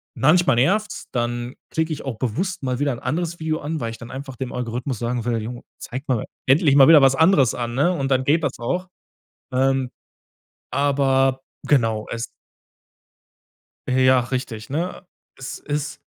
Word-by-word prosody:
manchmal 155 +4 +4
nervt's, 210 - +1
dann 120 +1 -2 0.2
klicke 160 0 0
ich - - -7
auch 130 -5 -4
bewusst 170 - -2
mal 130 -1 -1
wieder 145 -1 +1
'n 120 - -7
anderes 165 +6 -2
Video 160 0 -1
an, 155 +2 -3
weil 115 -3 -3
ich 115 - -9
dann 115 - -10
einfach 135 -1 -7
dem 130 +1 -5
Algorithmus 125 0 -3
sagen 120 -1 -2
will: 115 -2 0
„Jo, 120 +2 -7 0.2
zeig 130 +4 -7
mal 125 -5 0 0.2
endlich 140 +1 +4
mal 135 0 +8
wieder 160 -3 +8
was 135 0 +5
anderes 155 - +4
an“, 120 -1 -3
ne? 145 +7 +3
Und 135 -4 -2
dann 130 0 +3
geht 155 +4 +2
das 135 -2 -2
auch. 180 +10 -2 0.7
Ähm, 130 0 +1 0.8
aber, 135 -1 +2 0.3
genau, 115 -6 +2
es 115 0 -3 1.6
Ja, 130 0 +4
richtig, 120 -3 -4
ne? 175 +5 -3 0.3
Es 135 - -7
ist 145 0 -4
135 Hz, 165 wpm, -22 LUFS, 120-150 Hz, 1.6 s, mal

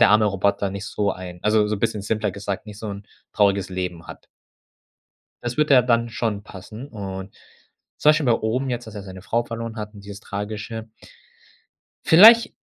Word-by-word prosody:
der 120 - +7
arme 105 0 +5
Roboter 100 0 0
nicht 100 +1 -6
so 100 0 -1
ein 90 -1 -9
also, 105 0 +3
so 105 - -1
'n - - -9
bisschen 105 - -1
simpler 105 -1 -1
gesagt, 100 +1 -5
nicht 105 -1 -10
so 110 - -6
'n 100 0 -7 0.3
trauriges 100 -2 +2
Leben 90 -2 -5
hat.“ - - -11 1.2
Das 120 0 -4
würde 150 -2 +4
ja 125 - +7
dann 115 -1 +1
schon 110 -3 -2
passen 105 +6 -10
und 95 -5 -7 0.6
zum 150 - +5
Beispiel 155 -3 +1
bei 120 - +5
Oben 125 +4 -1
jetzt, 120 -1 -4
dass 110 - -10
er 100 - -6
seine 95 -1 -10
Frau 115 +3 0
verloren 115 -1 -6
hat 105 0 -6
und 100 -1 -13
dieses 100 0 -9
Tragische. 110 +2 -6 1.2
Vielleicht, 225 +8 +8
105 Hz, 190 wpm, -23 LUFS, 100-115 Hz, 1.2 s, Vielleicht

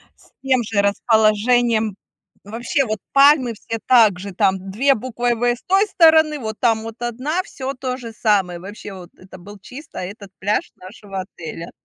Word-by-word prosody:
с - - -25
тем 260 -3 +2
же 210 -2 0
расположением. 220 +1 +2 0.5
Вообще, 240 +6 -1
вот, 215 -2 -3
пальмы 275 -3 +5
все 225 +2 -6
так 220 -7 +5
же, 200 +1 -7
там 190 +1 0
2 270 +8 +2
буквой 240 0 -2
В 235 - -5
с 240 0 0
той 390 +3 +2
стороны, 315 -4 +4
вот 220 -2 -6
там 225 -2 +1
вот 225 +1 -9
1, 255 +9 -2
всё 270 -5 -6
то 255 -1 -4
же 230 -3 -9
самое. 195 -6 0
Вообще, 200 +1 -9
вот 180 -2 -11
это 185 0 -14
был 205 +3 -12
чисто 260 +10 -12
этот 200 +1 -8
пляж 205 +2 -1
нашего 195 0 -8
отеля. 165 -2 -9
225 Hz, 170 wpm, -20 LUFS, 200-255 Hz, 0.5 s, пальмы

